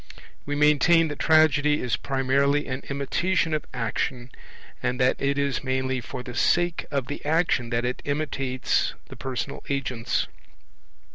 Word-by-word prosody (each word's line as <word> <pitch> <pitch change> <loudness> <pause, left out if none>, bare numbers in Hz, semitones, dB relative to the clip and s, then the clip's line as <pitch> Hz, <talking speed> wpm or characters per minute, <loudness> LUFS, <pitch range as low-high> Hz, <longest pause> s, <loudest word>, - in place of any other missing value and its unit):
We 145 - -1
maintain 150 +3 +4
that 145 - -6
Tragedy 150 -2 +4
is 125 -3 0
primarily 140 +2 +1
an 130 +1 -4
imitation 165 +5 0
of 155 - -2
action, 120 +1 -3 0.5
and 125 +1 -1
that 130 0 +3
it 140 0 +1
is 140 -2 0
mainly 130 0 -1
for 125 +2 -7
the 125 -1 -7
sake 175 +6 +1
of 140 -3 -1
the 145 - -6
action 155 -6 +1
that 120 0 0
it 125 - -2
imitates 140 -3 -1
the - - -9
personal 130 +1 -4
agents. 130 -4 -1
140 Hz, 145 wpm, -25 LUFS, 130-150 Hz, 0.5 s, maintain